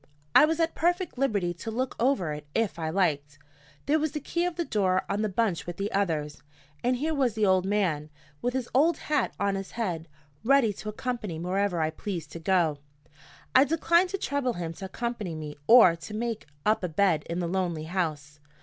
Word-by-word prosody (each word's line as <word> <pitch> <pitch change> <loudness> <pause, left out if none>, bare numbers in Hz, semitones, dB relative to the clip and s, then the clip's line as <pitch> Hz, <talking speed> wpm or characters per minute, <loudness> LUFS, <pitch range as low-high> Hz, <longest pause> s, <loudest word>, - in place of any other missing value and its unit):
I - - +8
was 320 +1 -1
at 330 0 +1
perfect 350 -4 0
liberty 200 -10 +1
to 175 +6 -7
look 250 +3 -2
over 230 - +1
it 150 0 -8
if 225 -6 0
I 160 -1 -2
liked. 150 -5 0 0.5
There 305 +3 +3
was 310 -1 -1
the 300 - -2
key 340 +4 -1
of 355 - -4
the 340 0 -2
door 185 -6 +1
on 200 +1 -1
the 215 - 0
bunch 195 -4 0
with 175 0 -5
the 200 +1 -2
others; 155 -7 -1 0.4
and 250 +1 +2
here 310 +6 -1
was 260 -7 +1
the 215 -1 +2
old 185 -1 +3
man, 175 -8 0 0.3
with 245 +1 -1
his 255 -2 -1
old 310 +5 +4
hat 295 -4 -1
on 200 0 +1
his 195 0 -5
head, 175 -8 -2 0.4
ready 250 -4 +4
to 215 +2 -7
accompany 215 -5 -4
me 165 - -5
wherever 190 -1 0
I 155 0 +1
pleased 165 -3 -5
to 165 - -7
go. 165 -4 +1 0.7
I 260 - +8
declined 335 +4 +3
to 390 - -2
trouble 285 -8 -1
him 170 -4 -4
to 180 +4 -8
accompany 215 -4 -4
me 150 -1 -6
or 225 -8 +8
to 170 +6 -9
make 230 -3 -3 0.2
up 215 -2 +2
a 180 - -1
bed 165 -2 +2
in 170 - -2
the 180 - -1
lonely 175 -3 -1
house. 155 -4 -3
200 Hz, 210 wpm, -27 LUFS, 170-255 Hz, 0.7 s, I